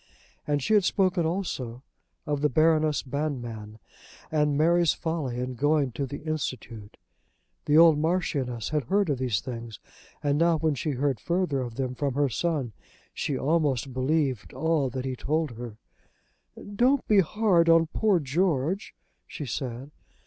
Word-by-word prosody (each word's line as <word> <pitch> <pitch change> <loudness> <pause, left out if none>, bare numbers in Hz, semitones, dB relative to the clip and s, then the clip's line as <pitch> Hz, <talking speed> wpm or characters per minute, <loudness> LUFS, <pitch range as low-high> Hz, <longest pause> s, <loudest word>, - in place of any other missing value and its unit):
And 145 -2 0
she 220 - +1
had 210 -2 +5
spoken 185 -3 +1
also 135 -9 -4 0.4
of 145 -1 -2
the 150 - +3
Baroness 155 +1 +2
Banmann 120 -7 -4 0.5
and 150 -2 +1
Mary's 170 +1 +3
folly 155 -7 -3
in 125 +1 -3
going 145 +1 +1
to 135 +3 -3
the 145 +3 -7
Institute. 125 -9 -5 0.7
The 150 - +4
old 165 -2 +7
Marchioness 145 -8 -1
had 150 -4 -1
heard 195 - +1
of 135 - -2
these 120 -7 0
things, 115 -4 -7 0.4
and 145 0 +1
now, 170 -1 +3
when 155 -1 +1
she 145 +2 -2
heard 135 -2 -1
further 175 - 0
of 120 -2 -6
them 130 -1 -2
from 135 0 -2
her 145 -1 +2
son, 140 -2 -2 0.4
she 140 - -2
almost 140 -4 0
believed 130 -3 -1
all 160 -4 +1
that 130 +1 -5
he 130 -1 -2
told 155 +3 -1
her. 115 -2 -8 1.0
"Don't 255 +5 +2
be 210 -2 +5
hard 185 -2 +3
upon 165 0 +6
poor 210 -5 +3
George," 165 +4 -1 0.3
she 150 - -6
said. 130 +2 -5
145 Hz, 155 wpm, -27 LUFS, 130-165 Hz, 1.0 s, old